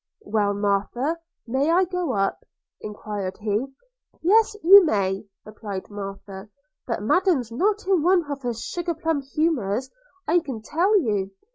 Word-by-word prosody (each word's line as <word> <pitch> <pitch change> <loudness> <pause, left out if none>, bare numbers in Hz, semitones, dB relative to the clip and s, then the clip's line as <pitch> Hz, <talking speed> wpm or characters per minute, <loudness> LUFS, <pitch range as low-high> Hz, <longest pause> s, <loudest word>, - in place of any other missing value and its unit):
'Well, 205 -1 0
Martha, 205 +10 -1 0.3
may 265 +5 0
I 355 +3 +4
go 360 -6 -2
up?' 195 -2 -1 0.4
enquired 205 -2 -5
he. 215 +4 -1 0.6
'Yes, 435 +4 +4
you 390 +4 +9
may,' 200 - 0 0.2
replied 210 -2 -7
Martha; 195 0 -8 0.4
'but 230 -4 -2
Madam's 315 - +2
not 400 - 0
in 375 -4 +2
one 350 +1 +3
of 280 -1 -4
her 240 -2 -2
sugar 345 +8 -4
plum 320 -2 -1
humours, 265 -6 -1 0.4
I 350 - +4
can 260 -9 -7
tell 370 - +2
you. 205 - -1
250 Hz, 140 wpm, -24 LUFS, 205-340 Hz, 0.6 s, you